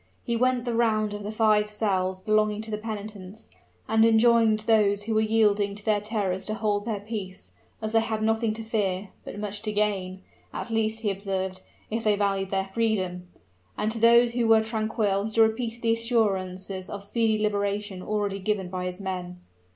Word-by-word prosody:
He 235 Hz, -, -1 dB
went 255 Hz, +1 st, +1 dB
the 240 Hz, -, -1 dB
round 215 Hz, -2 st, +1 dB
of 205 Hz, -, -5 dB
the 205 Hz, +1 st, -4 dB
five 215 Hz, -1 st, +3 dB
cells 190 Hz, -3 st, -1 dB
belonging 215 Hz, +1 st, +1 dB
to 220 Hz, -, -6 dB
the 210 Hz, -, -1 dB
penitents, 210 Hz, -2 st, -8 dB, 0.4 s
and 220 Hz, 0 st, +4 dB
enjoined 225 Hz, -1 st, +4 dB
those 210 Hz, -2 st, +3 dB
who 225 Hz, +1 st, -2 dB
were 215 Hz, -, +3 dB
yielding 210 Hz, -2 st, +2 dB
to 205 Hz, -, -11 dB
their 210 Hz, -2 st, +2 dB
terrors 200 Hz, -3 st, -2 dB
to 215 Hz, -, -1 dB
hold 210 Hz, -2 st, -1 dB
their 215 Hz, -4 st, -3 dB
peace, 200 Hz, -3 st, -6 dB, 0.3 s
as 215 Hz, -, -2 dB
they 225 Hz, -, +4 dB
had 220 Hz, -1 st, -2 dB
nothing 225 Hz, 0 st, +1 dB
to 225 Hz, -, -5 dB
fear, 200 Hz, -3 st, -1 dB
but -, -, -8 dB
much 205 Hz, 0 st, -4 dB
to 215 Hz, -, -3 dB
gain 195 Hz, -3 st, -1 dB, 0.3 s
at 235 Hz, -, -5 dB
least, 220 Hz, 0 st, 0 dB
he 210 Hz, -3 st, +1 dB
observed, 190 Hz, -1 st, -3 dB, 0.3 s
if 225 Hz, +1 st, -2 dB
they 210 Hz, -1 st, +3 dB
valued 195 Hz, -1 st, 0 dB
their 195 Hz, 0 st, -1 dB
freedom; 185 Hz, -6 st, -1 dB, 0.5 s
and 215 Hz, +1 st, 0 dB
to 225 Hz, -, -4 dB
those 235 Hz, +1 st, +6 dB
who 235 Hz, -1 st, 0 dB
were 225 Hz, -1 st, +6 dB
tranquil 215 Hz, -2 st, -1 dB
he 220 Hz, +1 st, -2 dB
repeated 225 Hz, +1 st, +1 dB
the 230 Hz, 0 st, +3 dB
assurances 195 Hz, -5 st, -1 dB
of 200 Hz, -1 st, -6 dB
speedy 220 Hz, +1 st, +1 dB
liberation 205 Hz, -2 st, -1 dB
already 205 Hz, -1 st, -2 dB
given 195 Hz, -2 st, -1 dB
by 180 Hz, 0 st, -4 dB
his 180 Hz, +1 st, -4 dB
men. 180 Hz, -2 st, -5 dB
210 Hz, 190 wpm, -26 LUFS, 195-225 Hz, 0.5 s, those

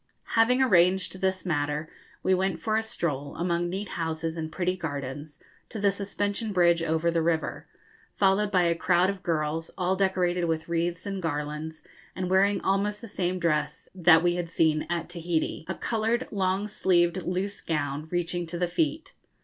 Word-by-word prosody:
Having 250 Hz, +3 st, +4 dB
arranged 185 Hz, -4 st, +3 dB
this 190 Hz, 0 st, 0 dB
matter, 150 Hz, -2 st, -1 dB, 0.4 s
we 190 Hz, -, +3 dB
went 185 Hz, -2 st, 0 dB
for 215 Hz, +6 st, 0 dB
a 220 Hz, -, +3 dB
stroll, 150 Hz, -10 st, -3 dB
among 175 Hz, 0 st, 0 dB
neat 195 Hz, +3 st, -4 dB
houses 160 Hz, 0 st, -3 dB
and 160 Hz, -1 st, -4 dB
pretty 185 Hz, +1 st, 0 dB
gardens, 145 Hz, -2 st, -5 dB, 0.3 s
to -, -, -7 dB
the 200 Hz, 0 st, +3 dB
suspension 205 Hz, +2 st, -2 dB
bridge 170 Hz, -3 st, +4 dB
over 165 Hz, +1 st, +1 dB
the 165 Hz, 0 st, +1 dB
river, 160 Hz, 0 st, -1 dB, 0.5 s
followed 200 Hz, +1 st, +3 dB
by 185 Hz, -3 st, +3 dB
a 170 Hz, -1 st, +3 dB
crowd 175 Hz, +2 st, +2 dB
of 195 Hz, -2 st, -9 dB
girls, 160 Hz, -1 st, -1 dB
all 185 Hz, 0 st, +1 dB
decorated 180 Hz, -2 st, +1 dB
with 160 Hz, -1 st, -1 dB
wreaths 170 Hz, +1 st, -1 dB
and 195 Hz, -1 st, -3 dB
garlands, 150 Hz, 0 st, -4 dB, 0.3 s
and 185 Hz, 0 st, -3 dB
wearing 200 Hz, +2 st, +4 dB
almost 200 Hz, +2 st, +1 dB
the 230 Hz, -, -9 dB
same 185 Hz, -2 st, -1 dB
dress 150 Hz, -3 st, -1 dB
that 175 Hz, -3 st, +5 dB
we 175 Hz, 0 st, +3 dB
had 175 Hz, -1 st, -3 dB
seen 160 Hz, -2 st, +2 dB
at 170 Hz, -1 st, -2 dB
Tahiti 170 Hz, -2 st, -2 dB
a -, -, -3 dB
coloured 230 Hz, +2 st, -1 dB
long 195 Hz, 0 st, 0 dB
sleeved 175 Hz, -3 st, +2 dB
loose 185 Hz, +3 st, -3 dB
gown 150 Hz, -1 st, -2 dB
reaching 175 Hz, 0 st, -2 dB
to 170 Hz, +1 st, -5 dB
the 180 Hz, -, +1 dB
feet. 310 Hz, -, -1 dB
175 Hz, 175 wpm, -27 LUFS, 160-195 Hz, 0.5 s, that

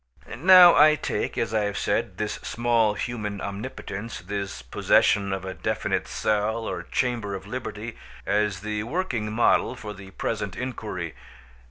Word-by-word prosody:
Now 180 Hz, +4 st, +9 dB
I 155 Hz, +1 st, +7 dB
take, -, -, -3 dB
as 110 Hz, -, -1 dB
I 110 Hz, -1 st, +2 dB
have 100 Hz, 0 st, -3 dB
said, -, -, -1 dB
this -, -, -3 dB
small 115 Hz, -3 st, +1 dB
human 105 Hz, -5 st, -4 dB
omnipotence, 100 Hz, +1 st, -6 dB
this 95 Hz, -8 st, -5 dB
possession 100 Hz, +9 st, +2 dB
of 95 Hz, -1 st, -3 dB
a 95 Hz, -, -4 dB
definite -, -, -2 dB
cell 110 Hz, +2 st, 0 dB
or -, -, -3 dB
chamber 115 Hz, -6 st, -1 dB
of 95 Hz, -, -8 dB
liberty, 120 Hz, -2 st, -6 dB, 0.3 s
as 105 Hz, -2 st, 0 dB
the 105 Hz, 0 st, -3 dB
working 120 Hz, -, -2 dB
model 120 Hz, +2 st, +2 dB
for 110 Hz, -3 st, -7 dB
the 95 Hz, -1 st, -11 dB
present 100 Hz, 0 st, -3 dB
inquiry. 125 Hz, -2 st, -5 dB
105 Hz, 150 wpm, -25 LUFS, 100-120 Hz, 0.3 s, Now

